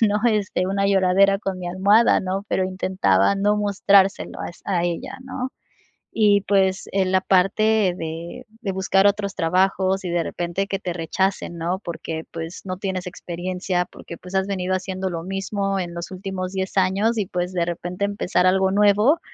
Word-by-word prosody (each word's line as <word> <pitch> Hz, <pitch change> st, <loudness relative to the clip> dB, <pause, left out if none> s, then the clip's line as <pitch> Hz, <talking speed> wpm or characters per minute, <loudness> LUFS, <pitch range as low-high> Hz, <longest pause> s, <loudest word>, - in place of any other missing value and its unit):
¿no? 210 Hz, -2 st, +3 dB
Este, 200 Hz, -4 st, 0 dB
una 195 Hz, +1 st, 0 dB
lloradera 195 Hz, 0 st, +4 dB
con 195 Hz, -2 st, -4 dB
mi 180 Hz, -1 st, -5 dB
almohada, 200 Hz, +5 st, +4 dB
¿no? 190 Hz, +1 st, -3 dB
Pero 190 Hz, -, +1 dB
intentaba 185 Hz, -, +2 dB
no 205 Hz, +1 st, +2 dB
mostrárselo 200 Hz, -1 st, +2 dB
a -, -, -4 dB
es 170 Hz, -, -13 dB
a 180 Hz, -4 st, 0 dB
ella, 175 Hz, +8 st, -4 dB
¿no? 260 Hz, 0 st, -5 dB, 0.7 s
Y, 205 Hz, -2 st, +5 dB
pues, 190 Hz, -1 st, +2 dB
en 190 Hz, -1 st, +1 dB
la 190 Hz, -, +3 dB
parte 195 Hz, +1 st, +3 dB
de 165 Hz, +9 st, -6 dB, 0.2 s
de 200 Hz, -, -2 dB
buscar 190 Hz, +1 st, +2 dB
otros 200 Hz, -1 st, -1 dB
trabajos 190 Hz, +3 st, +1 dB
y -, -, -2 dB
de 170 Hz, -1 st, 0 dB
repente 175 Hz, +4 st, -3 dB
que 195 Hz, -, -2 dB
te 180 Hz, -, -4 dB
rechacen, 175 Hz, +1 st, -2 dB
¿no? 170 Hz, +3 st, -1 dB
Porque, 165 Hz, -3 st, -5 dB
pues, 165 Hz, +1 st, -6 dB
no 185 Hz, -1 st, -4 dB
tienes 185 Hz, -2 st, -3 dB
experiencia, 180 Hz, +1 st, -3 dB
porque, 170 Hz, -1 st, -11 dB
pues, 180 Hz, +1 st, -12 dB
has 190 Hz, 0 st, +1 dB
venido 185 Hz, -2 st, -2 dB
haciendo 190 Hz, 0 st, -3 dB
lo 165 Hz, -, -4 dB
mismo 195 Hz, +1 st, -2 dB
en 175 Hz, -1 st, -4 dB
los 170 Hz, 0 st, -6 dB
últimos 185 Hz, -1 st, -5 dB
10 190 Hz, 0 st, -3 dB
años 195 Hz, +5 st, +2 dB
y, 200 Hz, -, -1 dB
pues, 180 Hz, +1 st, -3 dB
de 175 Hz, -2 st, 0 dB
repente 175 Hz, +3 st, -3 dB
empezar 200 Hz, -2 st, +1 dB
algo 190 Hz, +1 st, +3 dB
nuevo, 210 Hz, -, +4 dB
190 Hz, 180 wpm, -22 LUFS, 180-200 Hz, 0.7 s, Y